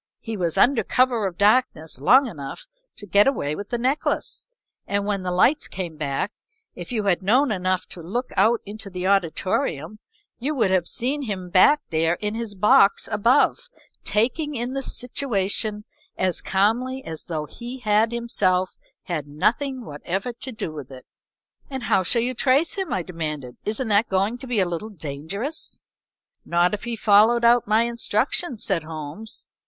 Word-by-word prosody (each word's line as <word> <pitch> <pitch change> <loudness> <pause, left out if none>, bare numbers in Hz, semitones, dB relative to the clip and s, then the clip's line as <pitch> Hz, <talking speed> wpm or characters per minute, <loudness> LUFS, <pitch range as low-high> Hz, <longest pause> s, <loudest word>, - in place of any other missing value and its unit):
He 225 -1 -6
was 175 -5 -1
under 255 -2 +4
cover 245 -5 +2
of 175 -2 -7
darkness 205 - +2
long 260 - +6
enough 160 - -7 0.3
to 205 - -9
get 200 +3 +4
away 150 - 0
with 205 +3 -7
the 240 - -1
necklace, 265 - -1 0.4
and 200 0 0
when 205 -2 -1
the 185 - -3
lights 245 +12 +3
came 175 -4 -5
back, 150 +6 -2 0.4
if - - -9
you 220 -3 -1
had 195 -3 +1
known 245 +7 +3
enough 185 -2 0
to 175 - -7
look 235 +10 -3
out 230 +1 +3
into 210 0 -8
the 180 -1 -5
auditorium 185 -1 0 0.4
you 290 +5 -2
would 225 -7 +2
have 180 -2 +2
seen 270 +5 -1
him 190 -8 -5
back 290 +12 +6
there 165 +1 +2
in 210 +3 -3
his 225 -2 -4
box 200 0 +4
above, 240 - +2 0.3
taking 280 +8 0
in 245 +1 -3
the 275 - -2
situation 215 -5 -2 0.3
as 185 -2 0
calmly 245 +7 0
as 160 -1 -6
though 155 -3 -3
he 240 - -8
had 220 -1 +2
himself 185 -6 0 0.2
had 155 -5 -4
nothing 245 - -1
whatever 185 +10 -4
to 260 +2 -7
do 215 -8 -5
with 145 -4 -8
it." 130 -1 -12 0.6
"And 265 -3 -5
how 200 - +3
shall 230 +6 +1
you 255 +1 -1
trace 270 +6 +2
him?" 385 -4 -4
I 185 - -1
demanded. 150 -7 -5
"Isn't 220 +3 -2
that 210 +3 +3
going 195 +5 0
to 260 - -8
be 240 -4 +1
a 185 - +3
little 175 +5 -4
dangerous?" 185 - -5 0.6
"Not 175 +2 +2
if 210 - -4
he 235 -1 -2
followed 220 +3 +4
out 235 -1 +5
my 215 +2 +4
instructions," 235 +4 -1
said 190 -5 0
Holmes. 155 +6 -7
210 Hz, 170 wpm, -23 LUFS, 180-240 Hz, 0.6 s, long